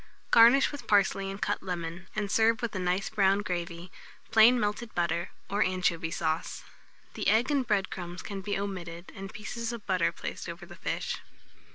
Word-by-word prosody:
Garnish 240 +4 +7
with 285 -5 -8
parsley 195 -1 +3
and 195 +1 -6
cut 205 - -1
lemon, 175 -1 -5
and 205 -2 -2
serve 225 +3 +3
with 235 - -2
a 190 - -2
nice 180 +2 0
brown 200 -1 +3
gravy, 175 -1 -4 0.4
plain 235 +3 +7
melted 210 +2 -2
butter, 170 -1 0 0.2
or 205 +1 -1
anchovy 180 -4 +1
sauce. 160 0 -2 0.5
The - - -3
egg 235 +6 +3
and 270 -4 +1
bread 200 -3 +1
crumbs 175 -1 -6
can 200 -1 -5
be 200 +1 -2
omitted, 180 -3 -5
and 195 0 -7
pieces 230 +2 -4
of 235 -3 -7
butter 185 -3 +2
placed - - -6
over - - -7
the - - -12
fish. - - -3
195 Hz, 180 wpm, -29 LUFS, 180-220 Hz, 0.5 s, Garnish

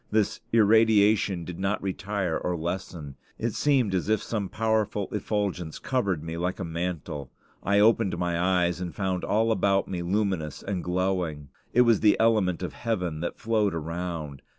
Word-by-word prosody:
This 110 -1 +1
irradiation 105 -4 +4
did 90 0 -7
not 95 +2 0
retire 95 -2 -2
or 90 -1 -2
lessen. 85 -4 -5 0.2
It 115 -1 -2
seemed 130 -9 +2
as 95 +2 -1
if 110 - +2
some 105 -4 -3
powerful 110 -2 0
effulgence 100 -5 -2
covered 100 - -1
me 80 0 -5
like 90 +3 -2
a - - -2
mantle. 80 -5 -4 0.3
I 100 +1 +2
opened 110 -3 +3
my 90 +1 +1
eyes 85 +1 -2
and 85 -3 -5
found 95 -2 -1
all 110 +2 +2
about 100 -2 +2
me 90 -2 -3
luminous 90 -5 -1
and 95 -3 -3
glowing. 90 -5 -1 0.2
It 125 - +5
was 115 -4 +4
the 105 -1 +4
element 105 -6 +2
of 90 - -4
heaven 90 -9 -2
that 85 - -4
flowed 110 -5 +1
around. 80 -3 -4
95 Hz, 165 wpm, -27 LUFS, 85-105 Hz, 0.3 s, It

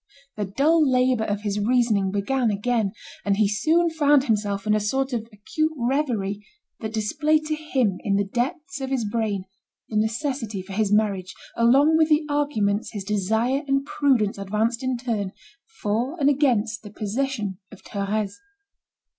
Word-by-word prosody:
The 210 - -2
dull 300 - +3
labour 250 -3 +2
of 205 -1 -2
his 210 -1 -2
reasoning 220 -3 +2
began 225 +5 0
again; 210 0 0 0.3
and 200 -1 +1
he 215 -1 +4
soon 320 - +2
found 290 -3 +4
himself 205 -5 -1
in 210 - +2
a 215 - +3
sort 265 +6 -1
of 230 -1 -3
acute 310 +10 -2
reverie 235 -6 -1 0.4
that 220 -1 -4
displayed 300 +8 +1
to 310 - -1
him 260 -11 0
in 200 -2 +1
the 200 - +2
depths 285 - -3
of 265 - -3
his 260 -4 0
brain, 205 -3 -1 0.5
the 215 - -2
necessity 225 -2 -1
for 190 +1 -9
his 210 0 0
marriage, 200 -3 +1 0.2
along 275 +7 +5
with 320 0 +3
the 305 0 +3
arguments 225 -9 0
his 205 -2 -4
desire 220 +7 0
and 275 0 +1
prudence 245 -10 +1
advanced 215 +5 -1
in 260 -1 -1
turn, 220 -6 -2 0.5
for 240 +10 -1
and 285 0 +4
against 235 -6 +1
the 210 - -10
possession 215 -2 -3
of 210 - -14
Thérèse. 200 0 -2
225 Hz, 165 wpm, -24 LUFS, 205-275 Hz, 0.5 s, along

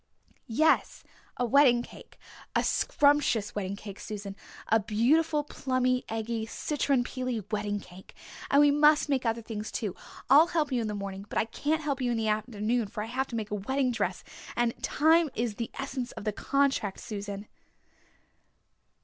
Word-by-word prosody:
"Yes, 310 +8 +2 0.3
a 245 - +1
wedding 245 -1 +5
cake - - -14 0.4
a - - +3
scrumptious 285 -7 +2
wedding 200 -1 -3
cake, 200 -1 -9
Susan 200 -2 -6 0.3
a 225 - +4
beautiful, 290 +9 +2
plummy, 255 -3 0
eggy, 225 0 -3
citron 275 0 0
peely 250 -4 -3
wedding 205 -1 -1
cake. 185 -1 -14 0.3
And 280 - +5
we 290 -1 +6
must 295 +1 +4
make 260 -4 +1
other 230 0 -1
things 215 -1 -5
too. 210 -6 -3 0.3
I'll 290 +6 +7
help 315 -4 0
you 250 -2 +1
in 225 - -2
the 210 - -3
morning. 200 0 -6
But - - -4
I - - +2
can't 305 +7 -1
help 280 -2 -2
you 250 - +1
in 235 - 0
the 220 -1 0
afternoon 215 +1 -1
for 210 +1 -5
I 225 +2 -7
have 265 +1 0
to 235 - -6
make 215 -2 -4
a 210 -1 -2
wedding 265 +4 0
dress 240 - -2 0.3
and 240 -1 +1
time 320 +2 +3
is 230 -2 -2
the 230 - -3
essence 265 -2 -4
of - - -8
the 215 - -1
contract, 275 -6 0
Susan." 200 -1 -6
235 Hz, 175 wpm, -29 LUFS, 210-275 Hz, 0.4 s, I'll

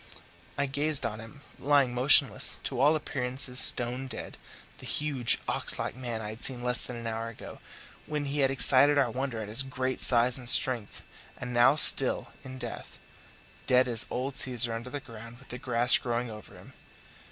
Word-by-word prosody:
I 140 - -2
gazed 140 0 -3
on 110 -1 -6
him 115 +6 -15 0.2
lying 140 -3 0
motionless, 130 +3 +2
to 130 - -5
all 145 +4 +2
appearances 130 -3 -4
stone 125 +2 +4
dead - - -10 0.4
the - - -11
huge, 140 -6 -1
ox - - -5
like - - -6
man 120 -3 -7
I 105 - -8
had 110 +3 -12
seen 125 -2 -1
less 125 -1 +6
than 125 - -9
an 115 0 -10
hour 115 0 -6
ago, 115 - -13 0.5
when 150 -1 -5
he 140 +1 -5
had 135 -1 +1
excited 135 +2 +4
our 130 -4 0
wonder 125 -3 -6
at - - -10
his 110 +5 +1
great 130 -1 -5
size 120 +1 +8
and 120 -1 0
strength, 120 -6 +2 0.3
and 125 -1 -9
now 120 +4 +3
still 155 - 0
in 130 0 -11
death 120 -2 -10 0.7
dead 125 0 +1
as 115 -2 -4
old 130 +2 -6
Caesar 120 -2 -1
under 115 +2 -8
the 145 - -7
ground 115 -3 -14
with 135 - -21
the 125 - -9
grass 120 0 +3
growing 120 -1 -5
over 105 -1 -14
him! - - -17
125 Hz, 185 wpm, -26 LUFS, 120-135 Hz, 0.7 s, size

